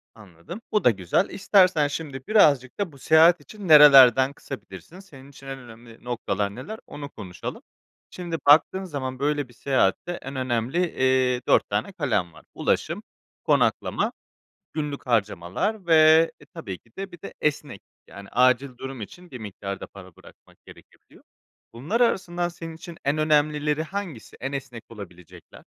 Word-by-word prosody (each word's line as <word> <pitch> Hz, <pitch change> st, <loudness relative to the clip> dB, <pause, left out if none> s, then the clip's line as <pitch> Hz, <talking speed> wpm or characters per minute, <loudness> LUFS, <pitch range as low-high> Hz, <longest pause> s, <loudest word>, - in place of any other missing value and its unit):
Anladım, 105 Hz, -, -11 dB
bu 210 Hz, -, +1 dB
da -, -, +6 dB
güzel. 95 Hz, -, 0 dB
İstersen 185 Hz, -6 st, +3 dB
şimdi 140 Hz, -3 st, -7 dB
birazcık 145 Hz, -, +3 dB
da 200 Hz, -5 st, -2 dB
bu 140 Hz, -, -16 dB
seyahat 160 Hz, +3 st, +5 dB
için 200 Hz, +7 st, -10 dB
nerelerden 135 Hz, -3 st, +8 dB
kısabilirsin, 135 Hz, -, -10 dB
senin 140 Hz, -8 st, -15 dB
için 135 Hz, -1 st, -15 dB
en 135 Hz, 0 st, -6 dB
önemli 115 Hz, -1 st, -15 dB
noktalar 100 Hz, -4 st, -3 dB
neler 160 Hz, -, -8 dB
onu 145 Hz, -1 st, -8 dB
konuşalım. 90 Hz, -8 st, -8 dB, 0.5 s
Şimdi, 175 Hz, -2 st, -5 dB
baktığın 160 Hz, +6 st, +5 dB
zaman 135 Hz, -6 st, -5 dB
böyle 145 Hz, -1 st, -1 dB
bir 120 Hz, -, -19 dB
seyahatte 130 Hz, -, 0 dB
en 135 Hz, -5 st, -7 dB
önemli, 130 Hz, +2 st, -2 dB
eee, 130 Hz, -1 st, +1 dB
4 -, -, +3 dB
tane 200 Hz, -, -2 dB
kalem 105 Hz, -, -1 dB
var. -, -, -17 dB
Ulaşım, -, -, -1 dB, 0.4 s
konaklama, -, -, +1 dB, 0.6 s
günlük 150 Hz, -3 st, -5 dB
harcamalar 110 Hz, -, -1 dB
ve, 160 Hz, 0 st, +6 dB
e, -, -, -17 dB
tabii 160 Hz, -, -8 dB
ki 115 Hz, -, -29 dB
de, 195 Hz, -1 st, -6 dB
bir 175 Hz, -, -13 dB
de, -, -, -9 dB
esneklik, 145 Hz, -8 st, -2 dB, 0.2 s
yani, 100 Hz, 0 st, -12 dB
acil 125 Hz, +1 st, +2 dB
durum 135 Hz, -1 st, -7 dB
için 175 Hz, -, -11 dB
bir 125 Hz, -, -7 dB
miktar 100 Hz, -2 st, -7 dB
da -, -, -8 dB
para 95 Hz, -3 st, -14 dB
bırakmak -, -, -19 dB
gerekebiliyor. -, -, -19 dB, 0.5 s
Bunlar 155 Hz, -, -2 dB
arasından 175 Hz, -6 st, 0 dB
senin 165 Hz, -1 st, -9 dB
için 165 Hz, 0 st, -11 dB
en 140 Hz, +2 st, +1 dB
önemlileri 150 Hz, 0 st, +1 dB
hangisi, 175 Hz, -, -7 dB
en 135 Hz, +2 st, -4 dB
esnek 130 Hz, -4 st, -7 dB
olabilecekler? 95 Hz, -6 st, -13 dB
140 Hz, 155 wpm, -24 LUFS, 120-165 Hz, 0.6 s, nerelerden